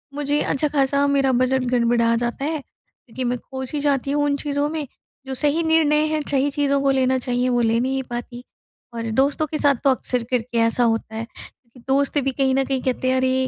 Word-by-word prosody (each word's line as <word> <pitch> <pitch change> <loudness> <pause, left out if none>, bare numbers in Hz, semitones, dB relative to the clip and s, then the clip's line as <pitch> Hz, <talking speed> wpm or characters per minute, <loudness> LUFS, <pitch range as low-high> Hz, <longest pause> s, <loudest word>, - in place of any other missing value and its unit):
मुझे 290 0 0
अच्छा 295 +2 0
खासा 280 -1 +1
मेरा 275 -1 +2
बजट 255 +1 +1
गड़बड़ा 235 -1 +2
जाता 240 +4 -2
है, 310 +1 -1
क्योंकि 260 -1 -11
मैं 245 0 0
खो 265 +1 -7
सी 290 +3 -3
जाती 280 -1 0
हूँ 290 0 +1
उन 285 -1 +1
चीज़ों 285 0 -1
में। 305 -2 -4 0.4
जो 265 - -4
सही 300 +4 +1
निर्णय 310 -2 +3
है, 310 0 -1
सही 280 +1 +1
चीज़ों 280 0 +1
को 275 0 +2
लेना 260 -1 +2
चाहिए, 250 0 -1
वो 245 -1 +2
ले 230 0 +2
नहीं 265 +2 -1
पाती 240 0 -6 0.5
और 230 -1 -4
दोस्तों 280 +6 +1
के 305 - -3
साथ 285 -2 +3
तो 280 - +4
अक्सर 250 -1 -1
करके 240 -1 -1
ऐसा 230 +2 +2
होता 225 -1 -1
है, 225 +1 -4 0.5
कि 250 - -16
दोस्त 280 +2 +2
भी 270 - 0
कहीं 265 0 +1
न 270 - +2
कहीं 265 -1 -1
कहते 255 0 -1
हैं, 260 - +2
"अरे 260 0 +1
265 Hz, 220 wpm, -22 LUFS, 245-285 Hz, 0.5 s, तो